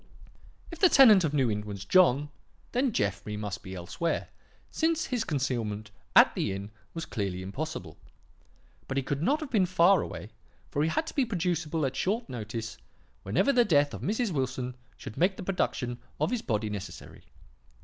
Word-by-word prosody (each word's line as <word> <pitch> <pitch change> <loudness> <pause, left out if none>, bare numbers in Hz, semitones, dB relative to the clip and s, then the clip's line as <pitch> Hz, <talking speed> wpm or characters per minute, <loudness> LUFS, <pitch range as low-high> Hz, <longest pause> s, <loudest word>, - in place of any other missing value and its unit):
"If 335 - -8
the 370 - +6
tenant 220 - +8
of 155 - +1
New 135 -6 +2
Inn 105 0 -1
was 100 -1 -7
John, 150 - +4 0.4
then 255 +1 +1
Jeffrey 105 - -2
must 105 -2 -4
be 95 -1 -8
elsewhere, 95 - -2 0.4
since 325 0 +1
his 245 -3 -1
concealment 115 -8 -2 0.2
at - - +8
the - - -1
inn 100 +2 -6 0.2
was 165 - -4
clearly 95 -4 -3
impossible. 95 - -5 0.9
But 135 - -3
he 135 - +1
could 140 +2 -2
not 290 - +2
have 305 - -6
been 200 -6 +3
far 185 +1 +5
away, - - -7 0.4
for 145 - 0
he 155 - +2
had 315 - 0
to - - -7
be 280 - +3
producible 175 - -1
at 130 0 -2
short 225 +5 -1
notice 110 -1 -5 0.4
whenever 110 - +2
the 245 - +5
death 145 -8 +3
of - - -6
Mrs. 220 +1 0
Wilson 130 -3 -2 0.2
should 120 -4 -9
make 185 +3 +2
the - - -6
production 130 -10 -1 0.2
of 155 - +1
his 245 -3 -1
body 110 -2 -1
necessary. 95 -4 -8
145 Hz, 180 wpm, -29 LUFS, -, 0.9 s, tenant